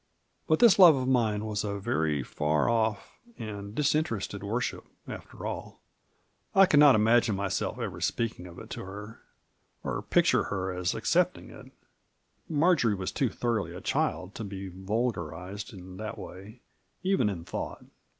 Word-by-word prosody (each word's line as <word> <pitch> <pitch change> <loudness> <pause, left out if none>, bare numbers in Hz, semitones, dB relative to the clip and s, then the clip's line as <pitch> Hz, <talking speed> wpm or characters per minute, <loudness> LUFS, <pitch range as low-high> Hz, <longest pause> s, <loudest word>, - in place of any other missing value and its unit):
But 155 - +4
this 225 -3 +6
love 175 -5 +10
of 130 -1 -2
mine 110 -5 +1
was 105 -2 -2
a 100 -1 -2
very 80 -6 0
far 75 +3 0
off 110 -2 0 0.2
and 100 -1 -7
dis 150 0 +2
interested 115 -10 -2
worship, 115 +5 -2 0.2
after - - -8
all. - - -6 0.8
I 195 0 +8
could 150 -6 +4
not 145 -3 +8
imagine 115 0 +4
myself 95 -1 -2
ever - - -5
speaking 115 -6 -2
of 85 - -12
it - - -11
to - - -5
her, 105 +4 -9 0.6
or - - -2
picture - - +3
her 95 -2 -2
as 90 0 -1
accepting - - +1
it. - - -13 0.8
Marjory 150 - +3
was 95 -1 -3
too 135 - 0
thorough 115 0 -1
a - - -8
child 90 +2 -1
to 115 - -6
be 95 -1 -6
vulgarized 95 -1 -3
in 95 -2 -11
that 110 0 -5
way, 100 +7 -10 0.4
even 190 - +2
in 85 -4 -5
thought. - - -5
105 Hz, 160 wpm, -29 LUFS, 95-120 Hz, 0.8 s, love